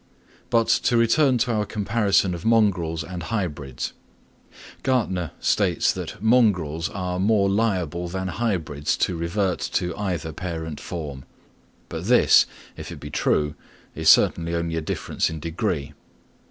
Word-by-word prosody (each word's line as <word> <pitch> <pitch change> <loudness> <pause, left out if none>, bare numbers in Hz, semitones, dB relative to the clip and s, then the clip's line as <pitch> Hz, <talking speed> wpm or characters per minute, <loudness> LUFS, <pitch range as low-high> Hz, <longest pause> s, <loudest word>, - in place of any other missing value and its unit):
But 115 -2 +3
to 120 +1 +2
return 125 +3 +4
to 120 +1 0
our 105 -1 +1
comparison 100 -3 +1
of 85 -1 -6
mongrels 95 -8 +2
and 90 +2 -6
hybrids: 75 - -3 0.9
Gärtner 100 - 0
states - - +2
that - - -6
mongrels 90 -9 +2
are 90 -1 -3
more 100 0 +3
liable 95 -5 0
than 95 +2 -3
hybrids 85 -8 -1
to 90 - 0
revert 90 +2 -1
to 90 - -1
either 85 -6 -3
parent 80 -3 -5
form; 75 -6 -6 0.6
but - - -6
this, - - +6 0.3
if - - -8
it - - -8
be 75 - -8
true, 75 0 +1 0.4
is - - +2
certainly 85 0 +4
only 85 -1 -2
a 80 - -1
difference 80 - -2
in 80 - -6
degree. 80 -2 -3
90 Hz, 140 wpm, -24 LUFS, 80-105 Hz, 0.9 s, this